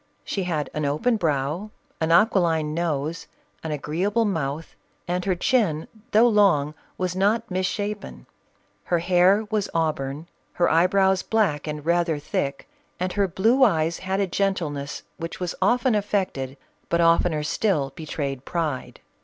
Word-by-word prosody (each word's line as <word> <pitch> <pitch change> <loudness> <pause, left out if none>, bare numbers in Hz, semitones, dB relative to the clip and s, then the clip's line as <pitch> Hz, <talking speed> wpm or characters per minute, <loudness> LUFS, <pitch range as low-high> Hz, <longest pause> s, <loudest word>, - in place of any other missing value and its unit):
She 195 -3 -3
had 155 -5 -1
an 150 - -2
open 155 +12 +1
brow, 155 +3 -1 0.3
an 160 0 0
aquiline 170 -5 +3
nose, 160 -1 -2 0.4
an 160 - -4
agreeable 175 +10 0
mouth, 160 -5 -3 0.3
and 180 +1 -1
her 190 -2 +1
chin, 175 -6 +1 0.2
though 230 +1 +5
long, 195 -10 +3 0.2
was 185 -1 -2
not 210 +4 +1
mis 185 0 0
shapen. 205 +1 -5 0.6
Her 175 - +1
hair 185 +5 +3
was 210 -2 0
au 165 -1 +3
burn, 135 +2 -6 0.3
her 175 - +2
eyebrows 190 +3 +3
black 185 -11 0
and 150 -1 -5
rather 170 -2 +2
thick; 140 - -3 0.3
and. 185 0 -2
her 200 -1 +2
blue 225 +9 +3
eyes 165 -7 +2
had 190 +1 -2
a 200 - +2
gentleness 165 -7 -2
which 165 0 -6
was 180 -1 -2
often 245 +5 +3
affected, 190 -10 -1 0.3
but 170 - +1
oftener 165 -2 +3
still 150 -4 0
betrayed 140 -4 -4
pride. 155 -6 -3
175 Hz, 145 wpm, -24 LUFS, 150-200 Hz, 0.6 s, though